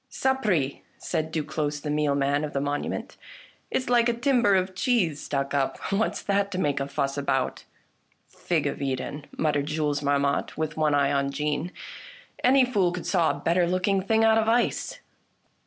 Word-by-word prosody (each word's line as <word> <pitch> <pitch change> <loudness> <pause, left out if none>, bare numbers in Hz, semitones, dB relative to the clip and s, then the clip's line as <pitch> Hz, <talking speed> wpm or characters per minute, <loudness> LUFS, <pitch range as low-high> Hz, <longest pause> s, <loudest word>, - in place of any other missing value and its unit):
" - - -47
Sapre! 210 - 0
" - - -36
said 160 -2 -1
Duclosse 150 -1 -2
the 150 - -3
mealman 145 -1 +1
of 150 - -4
the 140 - 0
monu 145 +1 -2
ment; - - -6 0.3
" - - -24
it's 255 - -1
like 240 -1 +4
a - - +2
timber 240 -5 +3
of 185 0 0
cheese 185 - +1
stuck 140 -1 -2
up. 140 -2 0
What's 205 +3 0
that 200 0 +1
to - - -3
make 145 -6 0
a 135 - -2
fuss 140 0 -2
about? 135 -2 -1 0.2
" - - -43
" - - -45
Fig - - -2
of - - -3
Eden," 140 +2 -3
muttered 145 -2 0
Jules 150 -2 -1
Marmotte, 140 0 0
with 155 -1 -2
one 155 -2 +2
eye 140 -1 +2
on 140 0 +1
Jeanne, 150 +4 -2 0.4
" - - -20
any 260 +1 +5
fool 200 -8 +1
could 180 -1 -5
saw 170 -4 +2
a - - -2
better 175 +1 +2
looking 185 +2 +1
thing 220 +3 +2
out 225 0 +5
of 220 0 +1
ice 240 +1 0
155 Hz, 200 wpm, -26 LUFS, 145-200 Hz, 0.4 s, any